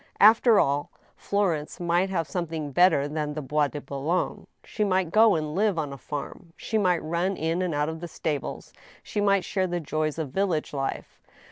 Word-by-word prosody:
After 220 Hz, +1 st, +6 dB
all, 140 Hz, +1 st, +1 dB, 0.3 s
Florence 175 Hz, -7 st, -1 dB
might 175 Hz, +2 st, +1 dB
have 165 Hz, -5 st, -1 dB
something 160 Hz, -1 st, -4 dB
better 155 Hz, -2 st, +4 dB
than 150 Hz, 0 st, -3 dB
the 155 Hz, -, -3 dB
Bois 150 Hz, +2 st, +1 dB
de 145 Hz, -, -6 dB
Boulogne: 140 Hz, +6 st, -2 dB, 0.2 s
she 215 Hz, -, -2 dB
might 185 Hz, -4 st, +1 dB
go 220 Hz, 0 st, +6 dB
and 155 Hz, -1 st, -2 dB
live 200 Hz, 0 st, +1 dB
on 150 Hz, -3 st, -2 dB
a -, -, -8 dB
farm; 150 Hz, +3 st, -7 dB
she 220 Hz, -, -1 dB
might 180 Hz, -4 st, +2 dB
run 170 Hz, +4 st, -1 dB
in 165 Hz, +3 st, -1 dB
and 180 Hz, -4 st, -1 dB
out 145 Hz, 0 st, +1 dB
of 160 Hz, 0 st, -4 dB
the 175 Hz, -, -6 dB
stables; 150 Hz, -3 st, -4 dB, 0.3 s
she 205 Hz, -, -3 dB
might 200 Hz, -2 st, +3 dB
share 190 Hz, -2 st, 0 dB
the 175 Hz, 0 st, -2 dB
joys 155 Hz, 0 st, -2 dB
of 155 Hz, -5 st, -4 dB
village 175 Hz, -3 st, -1 dB
life. 135 Hz, -1 st, -4 dB
165 Hz, 195 wpm, -26 LUFS, 150-185 Hz, 0.3 s, After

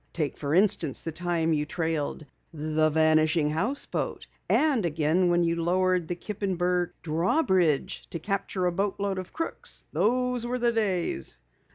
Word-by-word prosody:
"Take 155 Hz, -4 st, -2 dB
for 145 Hz, +1 st, -1 dB
instance 175 Hz, -7 st, +2 dB
the 165 Hz, -, -3 dB
time 165 Hz, 0 st, 0 dB
you 150 Hz, -1 st, 0 dB
trailed 160 Hz, -2 st, -2 dB, 0.3 s
the 155 Hz, 0 st, +1 dB
Vanishing 155 Hz, 0 st, +3 dB
Houseboat, 225 Hz, -, -2 dB, 0.2 s
and 290 Hz, -8 st, +3 dB
again 165 Hz, +2 st, +2 dB
when 175 Hz, 0 st, +3 dB
you 170 Hz, 0 st, 0 dB
lowered 180 Hz, 0 st, +2 dB
the 175 Hz, -, -2 dB
Kippenberg 180 Hz, -3 st, -1 dB
drawbridge 175 Hz, -, +1 dB
to -, -, -4 dB
capture 195 Hz, +1 st, -2 dB
a 180 Hz, -, +2 dB
boatload 195 Hz, +1 st, -1 dB
of 185 Hz, -, -8 dB
crooks! 330 Hz, -, -4 dB
Those 250 Hz, +1 st, +1 dB
were 245 Hz, +1 st, -2 dB
the 240 Hz, -1 st, +2 dB
days!" 185 Hz, -, -1 dB
175 Hz, 145 wpm, -27 LUFS, 160-200 Hz, 0.3 s, Vanishing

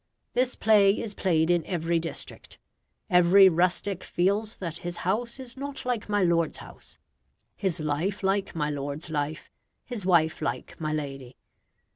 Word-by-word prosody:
This 250 Hz, 0 st, +1 dB
play 205 Hz, -2 st, +4 dB
is 220 Hz, -3 st, -4 dB
played 165 Hz, -4 st, +2 dB
in 175 Hz, -2 st, +2 dB
every 170 Hz, -2 st, 0 dB
district. 165 Hz, 0 st, -7 dB, 0.5 s
Every 185 Hz, +1 st, +7 dB
rustic 180 Hz, +2 st, 0 dB
feels 205 Hz, +5 st, 0 dB
that 170 Hz, -3 st, -5 dB
his 175 Hz, 0 st, -5 dB
house 235 Hz, +7 st, -1 dB
is 250 Hz, -2 st, -10 dB
not 280 Hz, 0 st, -6 dB
like 245 Hz, -4 st, -2 dB
my 205 Hz, -2 st, +2 dB
lord's 170 Hz, -2 st, +2 dB
house; -, -, -13 dB, 0.6 s
his 185 Hz, -4 st, -2 dB
life 160 Hz, +7 st, -2 dB
like 195 Hz, -1 st, 0 dB
my 150 Hz, -2 st, -1 dB
lord's 145 Hz, +3 st, -5 dB
life; 150 Hz, 0 st, -3 dB, 0.3 s
his 240 Hz, -6 st, -5 dB
wife 170 Hz, -3 st, +3 dB
like -, -, -3 dB
my 155 Hz, -1 st, -1 dB
lady. 135 Hz, -4 st, -5 dB
180 Hz, 150 wpm, -27 LUFS, 160-205 Hz, 0.6 s, Every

